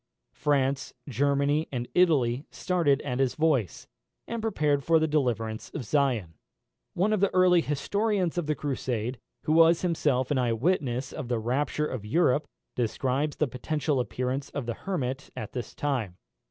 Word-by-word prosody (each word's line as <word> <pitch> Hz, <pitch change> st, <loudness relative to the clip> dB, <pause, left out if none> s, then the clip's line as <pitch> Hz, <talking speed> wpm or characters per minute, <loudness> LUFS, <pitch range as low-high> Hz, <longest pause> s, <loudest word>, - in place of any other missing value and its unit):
France, 135 Hz, -2 st, 0 dB
Germany, 140 Hz, +3 st, +1 dB
and 120 Hz, -2 st, -3 dB
Italy 145 Hz, -7 st, +3 dB
started 165 Hz, -6 st, +1 dB
at 125 Hz, -2 st, -3 dB
his 135 Hz, -2 st, +1 dB
voice, 150 Hz, -, +1 dB, 0.4 s
and 235 Hz, -1 st, -3 dB
prepared 150 Hz, -10 st, +1 dB
for 165 Hz, +3 st, +4 dB
the 160 Hz, 0 st, +2 dB
deliverance 120 Hz, -7 st, -1 dB
of 135 Hz, -, -4 dB
Zion. 120 Hz, -, +1 dB, 0.6 s
One 200 Hz, +5 st, +2 dB
of 215 Hz, -, +1 dB
the 200 Hz, 0 st, +2 dB
early 180 Hz, -2 st, +5 dB
historians 190 Hz, +5 st, 0 dB
of 165 Hz, -, -3 dB
the 150 Hz, -, +1 dB
Crusade, 125 Hz, -4 st, -3 dB, 0.2 s
who 155 Hz, +1 st, +1 dB
was 165 Hz, +1 st, +5 dB
himself 145 Hz, -7 st, +1 dB
an 140 Hz, -, +2 dB
eye 120 Hz, -2 st, +1 dB
witness 130 Hz, -2 st, 0 dB
of 125 Hz, -, -5 dB
the 120 Hz, -1 st, 0 dB
rapture 135 Hz, +6 st, 0 dB
of 130 Hz, -7 st, -4 dB
Europe, 145 Hz, +4 st, +2 dB, 0.3 s
describes 130 Hz, +5 st, -1 dB
the 155 Hz, -, +1 dB
personal 140 Hz, +3 st, -1 dB
appearance 130 Hz, +2 st, -2 dB
of 140 Hz, -, -4 dB
the 120 Hz, -, -2 dB
Hermit 140 Hz, -, -3 dB
at 110 Hz, -, -6 dB
this 125 Hz, -2 st, -5 dB
time. 125 Hz, -11 st, -2 dB
140 Hz, 160 wpm, -27 LUFS, 125-160 Hz, 0.6 s, early